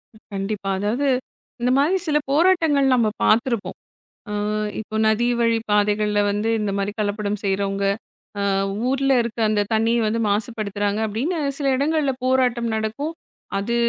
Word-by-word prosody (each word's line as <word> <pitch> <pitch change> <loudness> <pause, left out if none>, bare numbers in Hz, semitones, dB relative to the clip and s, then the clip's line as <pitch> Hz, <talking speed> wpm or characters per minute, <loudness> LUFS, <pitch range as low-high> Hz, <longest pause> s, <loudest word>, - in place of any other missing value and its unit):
ம், 215 - -19
கண்டிப்பா. 195 0 -3
அதாவது 230 +8 0 0.5
இந்தமாரி 275 +9 +3
சில 300 -1 +3
போராட்டங்கள் 315 -3 +3
நம்ம 235 -3 +2 0.2
பார்த்துருப்போம். 235 0 +1 0.5
ஆ, - - -3 0.5
இப்போ 215 0 -6
நதி 220 +2 +2
வழி 230 -1 +3
பாதைகள்ல 210 0 +2
வந்து 210 +2 -1
இந்தமாரி 200 -1 -1
கலப்படம் 205 0 -2
செய்றவங்க. 195 0 0 0.6
ஆ - - 0 0.5
ஊர்ல 270 +1 +2
இருக்க 235 0 -5
அந்த 215 -1 +1
தண்ணீய 225 +2 +2
வந்து 225 +2 0
மாசுப்படுத்துறாங்க 205 -1 -1
அப்பிடின்னு 260 - -2 0.2
சில 285 - -2
இடங்கள்ல 290 0 +1
போராட்டம் 250 -2 +2
நடக்கும். 220 +8 -2 0.5
அது 205 +4 -2
220 Hz, 130 wpm, -22 LUFS, 205-260 Hz, 0.6 s, இந்தமாரி